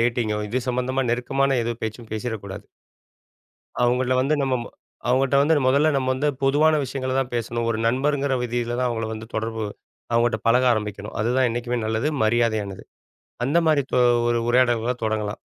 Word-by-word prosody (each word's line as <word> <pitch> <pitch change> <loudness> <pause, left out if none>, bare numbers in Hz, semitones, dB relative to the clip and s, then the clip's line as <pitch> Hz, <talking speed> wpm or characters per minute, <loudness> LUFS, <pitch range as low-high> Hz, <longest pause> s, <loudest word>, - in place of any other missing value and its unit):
டேட்டிங்கோ? 115 -2 0
இது 130 +4 -1
சம்பந்தமா 125 +2 0
நெருக்கமான 135 +2 +1
எது 120 - -1
பேச்சும் 110 +1 -5
பேசிறக்கூடாது. 105 -3 -5 1.2
அவங்கள்ல 125 +1 +2
வந்து 140 +4 +2
நம்ம 135 -1 +1 0.5
அவங்ககிட்ட 135 +2 +3
வந்து 155 +3 +4
முதல்ல 140 +4 +4
நம்ம 130 -1 -1
வந்து 145 +3 0
பொதுவான 150 +3 +4
விஷயங்கள 130 0 -3
தான் 130 -2 -4
பேசணும். 120 0 -2
ஒரு 110 - -1
நண்பர்ங்கிற 140 +2 +1
விதியில 120 0 -2
தான் 125 0 +1
அவங்கள 115 -2 -2
வந்து 110 0 -7
தொடர்பு 110 0 -2 0.5
அவங்கட்ட 115 -1 +2
பழக 125 +2 +4
ஆரம்பிக்கணும். 105 -2 -4
அதுதான் 125 +3 +2
என்னைக்குமே 120 +1 -2
நல்லது. 110 +6 0 0.2
மரியாதையானது. 110 -4 0 0.6
அந்த 145 +7 +2
மாரி 150 -2 +3
தொ - - +3 0.3
ஒரு 120 0 +2
உரையாடல்கள 120 -1 +2
தொடங்கலாம். 110 -1 -2
120 Hz, 150 wpm, -23 LUFS, 110-130 Hz, 1.2 s, வந்து